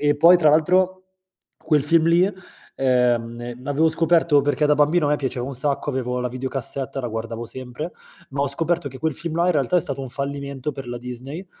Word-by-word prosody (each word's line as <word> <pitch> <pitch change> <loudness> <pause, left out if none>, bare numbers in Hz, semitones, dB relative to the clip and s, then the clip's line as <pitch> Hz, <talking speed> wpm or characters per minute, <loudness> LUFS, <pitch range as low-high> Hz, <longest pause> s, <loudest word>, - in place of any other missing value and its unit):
e 145 0 +3
poi 170 +4 +7
tra 155 -4 +4
l'altro 180 +4 +3 0.6
quel 150 -3 +2
film 165 +2 +3
lì, 170 +2 +5
ehm 125 - -1
ehm, 120 +2 -8
avevo 150 +3 +2
scoperto 165 -2 +3
perché 145 +2 0
da 150 - +4
bambino 150 +2 +3
a - - +1
me 150 - +3
piaceva 130 -3 -3
un 140 - -5
sacco, 140 +2 0
avevo 125 -1 -2
la 125 - -1
videocassetta, 135 +1 -3
la 120 - -4
guardavo 115 +1 -5
sempre, 130 +7 -7 0.4
ma 140 +1 -3
ho 140 - 0
scoperto 165 +2 +1
che 130 -1 -10
quel 160 -2 -1
film 165 +3 -5
là 170 +1 +2
in 180 - +3
realtà 145 +1 +1
è 175 - +4
stato 140 -3 -4
un 135 - -5
fallimento 140 +1 -4
per 135 -3 -8
la 120 - -4
Disney, 130 +9 -7
140 Hz, 210 wpm, -22 LUFS, 125-160 Hz, 0.6 s, poi